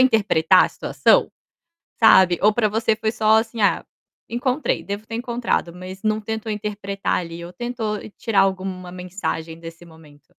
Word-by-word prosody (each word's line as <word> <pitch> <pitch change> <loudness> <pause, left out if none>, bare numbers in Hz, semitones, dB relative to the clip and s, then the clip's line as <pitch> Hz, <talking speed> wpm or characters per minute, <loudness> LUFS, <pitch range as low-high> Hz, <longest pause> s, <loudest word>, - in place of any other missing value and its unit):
interpretar 215 -10 +4
a - - -2
situação, - - +2 0.7
sabe. 185 -6 +6
Ou 210 +2 +5
para 215 0 +1
você 225 +1 +1
foi 220 0 -1
só, 220 -1 +3
assim: 225 0 -3
"Ah, 200 - +3 0.5
encontrei, 255 +4 -1
devo 205 +2 -5
ter 225 - -7
encontrado", 235 -7 -2
mas 185 +2 -10
não 215 0 0
tentou 220 +1 -4
interpretar, 200 -1 -3
ali, 170 -1 -8
ou 170 +1 -9
tentou 235 -3 -3 0.2
tirar 215 -4 +2
alguma 185 -2 -3
mensagem 180 -3 -5
desse 165 +1 -11
momento? 150 -3 -18
205 Hz, 155 wpm, -22 LUFS, 180-225 Hz, 0.7 s, sabe